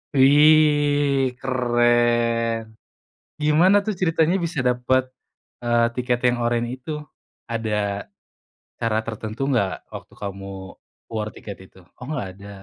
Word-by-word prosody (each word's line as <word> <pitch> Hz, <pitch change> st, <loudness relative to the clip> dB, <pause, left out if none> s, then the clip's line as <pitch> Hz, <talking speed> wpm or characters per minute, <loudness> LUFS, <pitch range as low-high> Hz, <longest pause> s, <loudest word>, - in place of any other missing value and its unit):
Wih 145 Hz, -1 st, +4 dB
keren, 120 Hz, -3 st, +1 dB, 0.6 s
gimana 170 Hz, +7 st, +5 dB
tuh 215 Hz, -, -1 dB
ceritanya 165 Hz, 0 st, +2 dB
bisa 160 Hz, -4 st, -3 dB
dapet, 125 Hz, +1 st, +1 dB, 0.6 s
eee, 120 Hz, 0 st, +3 dB
tiket 125 Hz, -1 st, 0 dB
yang 125 Hz, -, +1 dB
oranye 120 Hz, +1 st, -1 dB
itu? 130 Hz, +5 st, -10 dB, 0.6 s
Ada, 115 Hz, -2 st, -3 dB, 1.0 s
cara 115 Hz, -2 st, 0 dB
tertentu 110 Hz, +1 st, -6 dB, 0.2 s
gak 95 Hz, -4 st, 0 dB
waktu -, -, -10 dB
kamu 100 Hz, -1 st, -6 dB, 0.6 s
war 110 Hz, -1 st, -3 dB
tiket 100 Hz, -, -9 dB, 0.2 s
itu? -, -, -19 dB, 0.2 s
Oh 125 Hz, -, -10 dB
gak 125 Hz, -10 st, -3 dB
ada. 100 Hz, +1 st, -12 dB
120 Hz, 115 wpm, -22 LUFS, 115-145 Hz, 1.0 s, gimana